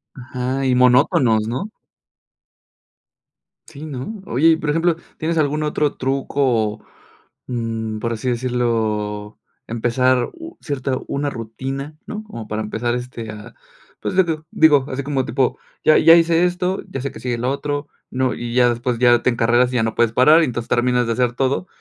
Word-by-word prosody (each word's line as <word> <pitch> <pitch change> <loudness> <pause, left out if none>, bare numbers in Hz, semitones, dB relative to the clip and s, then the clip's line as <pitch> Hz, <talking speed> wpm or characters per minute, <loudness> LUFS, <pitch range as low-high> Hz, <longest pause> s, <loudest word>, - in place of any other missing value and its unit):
Ajá. 130 +1 -3
Y 130 -1 +2
monótonos, 125 -3 +4
¿no? 130 - -3 2.0
Sí, 150 +1 -10
¿no? 155 - -6
Oye, 135 +7 +2
y 165 - +5
por 150 - -3
ejemplo, 165 +2 +2 0.2
¿tienes 165 +1 -2
algún 150 0 +1
otro 150 -1 0
truco? 130 -4 0
O, - - -15 0.6
mm, 115 -2 -3
por 115 +1 -2
así 115 +3 -3
decirlo, 110 -4 -2 0.3
empezar 120 +2 +1
u 335 +1 -11
cierta 135 -2 -2
una 145 +1 -1
rutina, 135 +5 -6
¿no? 215 0 -6
Como 115 - -9
para 110 0 -3
empezar, 110 +3 -2
este, 125 -2 -6
a, 105 -1 -11 0.5
pues, - - -3
de 190 -1 +5
que 160 -2 -2
digo, 150 -4 +4
así 135 +1 -3
como 135 -1 -1
tipo, 130 0 0 0.3
ya 155 - +6
ya 165 - +8
hice 165 0 +3
esto, 180 +1 -1
ya 135 - -5
sé 140 0 -4
que - - -11
sigue 125 -2 -2
lo 125 +3 -1
otro, 145 +1 -3 0.2
¿no? 130 0 0
Y 120 0 -5
ya 125 -1 +5
después 120 0 -2
ya 120 -1 +4
te - - +3
encarreras, 120 +1 +2
y - - -2
ya 115 - +2
no 115 - -2
puedes 120 -2 +2
parar, 150 +7 +6
y - - +3
entonces 120 -3 -4
terminas 125 0 +2
de 115 - +1
hacer 125 0 0
todo, 135 +7 -1
125 Hz, 180 wpm, -20 LUFS, 120-145 Hz, 2.0 s, ya